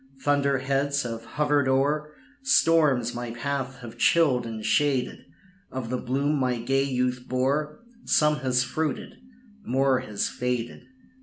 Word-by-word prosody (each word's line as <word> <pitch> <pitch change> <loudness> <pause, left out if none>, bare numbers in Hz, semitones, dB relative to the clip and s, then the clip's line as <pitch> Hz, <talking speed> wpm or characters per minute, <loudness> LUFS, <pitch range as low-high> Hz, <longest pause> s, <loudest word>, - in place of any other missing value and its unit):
Thunder 140 -1 +2
heads 140 +1 0
have 115 -1 -5
hovered 145 0 +1
o'er 145 +3 +1 0.3
Storms 155 - +3
my 120 0 -5
path 130 +1 -4
have 120 0 -10
chilled 130 -8 +3
and 110 -1 -6
shaded; 140 -4 +1 0.5
Of 130 -3 -5
the 130 - 0
bloom 140 +4 0
my 125 -2 0
gay 135 +4 +1
youth 125 -1 -1
bore, 145 - -1 0.2
Some 150 0 +3
has 125 -3 +1
fruited 145 +4 -3 0.5
more 135 0 +2
has 105 -6 -2
faded." 125 -1 -3
130 Hz, 135 wpm, -26 LUFS, 125-145 Hz, 0.5 s, Storms